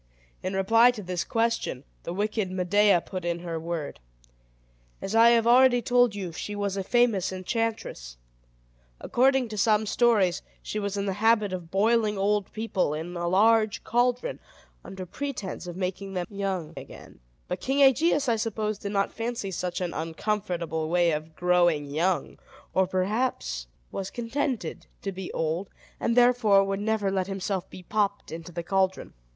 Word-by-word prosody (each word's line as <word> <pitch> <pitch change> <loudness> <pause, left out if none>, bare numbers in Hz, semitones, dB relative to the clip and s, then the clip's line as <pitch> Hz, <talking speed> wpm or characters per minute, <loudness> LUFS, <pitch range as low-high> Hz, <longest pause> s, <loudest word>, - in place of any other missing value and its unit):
In 190 +1 -3
reply 225 +5 +5
to 235 -4 -3
this 180 -1 -2
question, 230 - -1 0.2
the - - -3
wicked 205 +1 -1
Medea 185 +1 +3
put 185 0 -6
in 170 0 -2
her 165 -2 -4
word. 160 - -4 1.0
As 195 - -5
I 230 +1 +7
have 230 -1 +4
already 245 +1 +6
told 245 -3 +3
you, 190 -4 -4
she 205 +5 -5
was 200 -1 -2
a 195 - -2
famous 215 -5 +2
enchantress. 185 - -3 0.8
According 265 0 +2
to 215 -1 -5
some 215 +1 +3
stories, 210 -5 +2 0.2
she 215 - -3
was 200 -1 -3
in 200 - -1
the 195 - -1
habit 220 -3 +3
of 175 -3 -6
boiling 215 +2 +2
old 200 0 0
people 215 -8 -1
in 170 +3 -6
a 175 0 -2
large 215 +3 +3
caldron, 245 - 0 0.4
under 190 -1 -7
pretense 210 -4 -5
of 175 0 -7
making 195 +1 -4
them 180 -1 -1
young 190 -5 -3
again; - - -11 0.3
but - - -4
King 275 +2 +1
Aegeus, 280 +2 +4
I 230 -2 +2
suppose, 215 -1 -2
did 200 -1 -5
not 200 0 0
fancy 230 -4 -3
such 180 0 -3
an 175 -2 -2
uncomfortable 165 -1 -2
way 175 0 +3
of 155 +1 -4
growing 175 -4 +2
young, 175 +5 -1 0.3
or 190 0 +3
perhaps 185 - -1 0.2
was 195 0 -4
contented 240 - -3 0.2
to 195 - -2
be 190 -1 -6
old, 165 +4 -2 0.3
and 235 +1 0
therefore 240 -5 +5
would 195 0 -2
never 210 -2 0
let 190 -1 -1
himself 195 -1 -3
be 185 - -11
popped 205 +1 -1
into 165 +1 -7
the 170 0 -5
caldron. 190 +1 0
195 Hz, 165 wpm, -27 LUFS, 180-225 Hz, 1.0 s, I